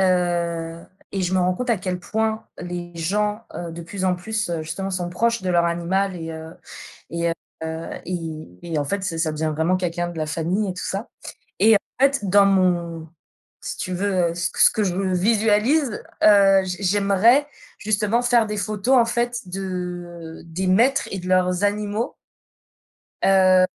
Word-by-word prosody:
heu, 170 -3 0 0.3
et 195 -2 -1
je 180 +1 0
me - - +3
rends 180 0 +2
compte 250 +4 -2
à 225 - +3
quel 180 -1 -3
point 220 +2 -1
les 175 -1 -6
gens, 210 +6 -1
heu, 170 -1 -5
de 170 +1 -7
plus 190 +3 -5
en 185 -1 +3
plus, 220 +3 -3
heu, 165 -2 -2
justement, 195 +5 -4
sont 180 -2 -2
proches 230 +4 0
de 185 - -1
leur 170 -1 +3
animal 180 +3 0
et 165 -1 -6
heu, 160 +1 -9 0.6
et 170 +1 -1
heu, 165 - 0 0.7
et 165 - -5
et 165 -3 -3
en 145 - 0
fait, 195 +6 -2
ça 165 -3 -3
ça 160 -2 0
devient 155 0 -1
vraiment 165 +4 +2
quelqu'un 175 -1 -2
de 170 -2 -7
la 155 - -1
famille 180 +6 -1
et - - -5
tout 185 - -6
ça, 200 +5 -3 0.5
et 220 +1 +6
en 200 - +4 0.2
fait, 275 0 +4
dans 200 +1 +6
mon 175 -4 +1 0.5
si - - -5
tu 185 - -4
veux, 185 -2 +1
heu, 170 - -5
ce 175 -1 -1
que - - -9
ce - - +8
que 215 - -1
je 180 -2 -1
visualise, 210 - +2 0.2
heu, 195 -2 +7
j'ai 185 +2 -5
j'aimerais, 205 +8 +4 0.3
justement, 215 +2 +1
faire 240 -2 +3
des 210 0 -3
photos, 215 +5 +1
en 235 - +5
fait, 240 +1 -1
de 175 -3 -6
des 180 +3 -3
maîtres 235 +9 +3
et 195 - -3
de 180 - -8
leurs 180 +1 +2
animaux. 210 +3 -1 1.1
Heu, 185 -1 +5
185 Hz, 185 wpm, -22 LUFS, 175-210 Hz, 1.1 s, ce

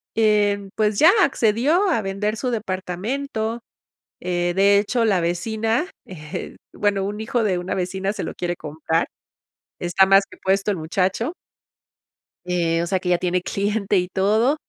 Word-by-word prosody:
eh, 205 -2 +2
pues 210 -1 +1
ya 325 +4 +8
accedió 280 - +2
a 315 -11 +1
vender 200 +2 -2
su 250 +3 -2
departamento, 220 +3 -3 0.6
eh, 175 -1 -1
de 200 +1 +5
hecho, 230 +3 0
la 195 -5 +2
vecina, 220 - -1 0.2
eh, 155 -5 -7 0.2
bueno, 200 -2 0
un 205 +2 -4
hijo 230 +1 0
de 190 -4 +1
una 180 +1 -3
vecina 190 +1 -2
se - - -5
lo - - -5
quiere 175 -1 -3
comprar, 160 +2 -2 0.7
está 180 +2 +3
más 195 +1 +6
que - - -14
puesto 195 +2 +1
el 195 - -2
muchacho, 190 - -1 1.1
eh, 170 -2 0
o 170 - -2
sea 190 +1 0
que 180 - -2
ya 175 - +4
tiene 180 0 0
cliente 200 +1 0
y 180 0 +1
todo, 215 +9 +2
200 Hz, 160 wpm, -22 LUFS, 180-220 Hz, 1.1 s, ya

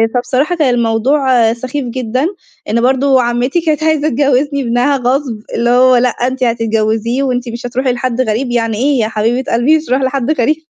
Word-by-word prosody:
فبصراحة 255 +7 0
كان 295 -7 +1
الموضوع 235 +1 +2
سخيف 255 +3 -5
جدًا 250 +2 -2 0.4
إن 230 +2 +1
برضه 265 +1 +2
عمّتي 245 +7 0
كانت 310 -2 -1
عايزة 315 -1 +1
تجوّزني 280 +1 +1
ابنها 250 +3 +1
غصب، 255 0 -1 0.2
اللي 235 +1 0
هو 255 +1 +5
لأ 250 +1 +3
أنتِ 255 +2 -3
هتتجوّزيه 230 +1 0
وأنتِ 250 -2 -2
مش 235 +1 -7
هتروحي 255 +2 -1
لحد 255 -1 -2
غريب، 240 +2 -1
يعني 230 -2 -1
إيه 270 +3 +1
يا 215 - +1
حبيبة 225 +4 -1
قلبي 250 +7 +3
مش 310 - -5
هاروح 260 +2 +1
لحد 260 +1 -1
غريب؟! 305 +1 +1
250 Hz, 180 wpm, -14 LUFS, 235-275 Hz, 0.4 s, هو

